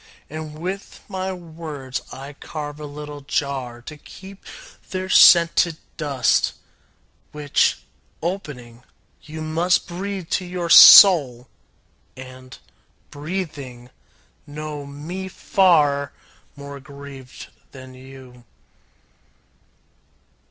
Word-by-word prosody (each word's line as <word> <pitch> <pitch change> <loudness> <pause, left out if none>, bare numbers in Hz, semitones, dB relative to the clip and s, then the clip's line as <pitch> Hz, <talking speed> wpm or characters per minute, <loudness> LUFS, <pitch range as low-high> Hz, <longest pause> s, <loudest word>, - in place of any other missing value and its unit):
And 155 -1 -8
with 185 +5 -7
my 190 -1 -4
words 155 -7 -8
I 135 +2 -9
carve 150 0 -8
a 150 - -7
little 145 0 -9
jar 135 -4 -4
To 150 +4 -10
keep 195 +5 -14 0.5
their 185 0 -5
scented 170 -2 +5 0.2
dust, 140 -6 0 0.8
Which, 150 -2 +1 0.4
opening, 140 -10 -7 0.4
you 155 +1 -9
must 165 +3 0
Breathe 185 0 -6
to 185 - 0
your 175 -1 -4
soul, 140 - +8 0.7
and, 130 0 -12 0.5
breathing, 145 -7 -7 0.6
know 150 -1 -7
me 165 +7 -7
far 150 -8 +1 0.4
More 140 0 -10
grieved 140 -2 -12 0.2
than 130 -1 -13
you. 130 -1 -15
150 Hz, 90 wpm, -21 LUFS, 135-170 Hz, 0.8 s, soul